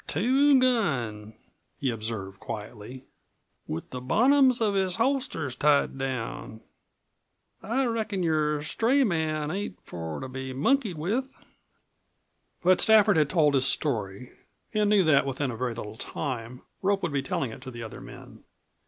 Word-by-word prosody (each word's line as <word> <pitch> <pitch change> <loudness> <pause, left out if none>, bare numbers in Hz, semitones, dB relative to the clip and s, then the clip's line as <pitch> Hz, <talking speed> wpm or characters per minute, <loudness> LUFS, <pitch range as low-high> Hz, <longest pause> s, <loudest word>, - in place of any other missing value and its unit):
"Two 265 - +4
gun," 125 - 0 0.4
he 135 -3 -1
observed 110 -4 -5
quietly; 110 +4 -8 0.6
"with 80 - -5
the 125 - -5
bottoms 255 - +4
of 215 -3 +1
his 190 -2 0
holsters 230 - -1
tied 145 +1 +2
down. 125 -4 -5 1.0
I 260 +5 0
reckon 220 -5 -1
your 150 -2 +1
stray 245 - +2
man 155 - -1
ain't 200 +4 -4
for 80 -2 -6
to 130 - -6
be 130 0 -6
monkeyed 205 - +1
with." 235 - -3 1.2
But 185 +1 +5
Stafford 215 -4 +5
had 150 -2 +3
told 150 -4 +3
his 135 -1 +2
story 115 -4 -2 0.4
and 210 -1 +2
knew 205 -2 +5
that 155 -4 +4
within 135 0 -2
a - - -6
very 120 0 -3
little 110 -1 -7
time 125 -3 -5 0.2
Rope 195 0 +1
would 165 -4 -1
be 140 - +1
telling 135 -2 -2
it 110 - -10
to 130 - -8
the 120 -2 -7
other 110 - -8
men. - - -12
150 Hz, 150 wpm, -27 LUFS, 125-210 Hz, 1.2 s, But